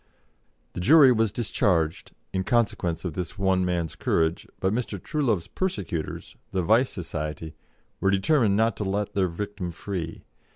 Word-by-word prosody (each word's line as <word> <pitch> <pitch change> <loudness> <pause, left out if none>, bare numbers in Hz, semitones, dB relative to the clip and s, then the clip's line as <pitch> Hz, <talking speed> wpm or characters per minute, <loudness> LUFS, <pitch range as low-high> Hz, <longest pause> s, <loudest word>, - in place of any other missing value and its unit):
The - - -5
jury 140 - +7
was 115 -3 +2
discharged, 90 -8 0 0.2
in 95 0 0
consequence 95 -7 0
of 85 - -2
this 90 +4 -5
one 95 -2 +2
man's 85 -4 -1
courage, 80 0 0
but 95 +2 +1
Mr. 110 -4 -2
Truelove's 120 - 0
persecutors 100 - -4 0.2
the 95 -1 0
Vice 115 +8 +4
Society 80 -2 -5 0.5
were 100 - +2
determined 100 +1 +3
not 110 -1 +2
to - - -2
let 100 +1 -2
their 95 -2 +2
victim 95 +1 -5
free. 85 -1 -5
95 Hz, 150 wpm, -26 LUFS, 85-110 Hz, 0.5 s, jury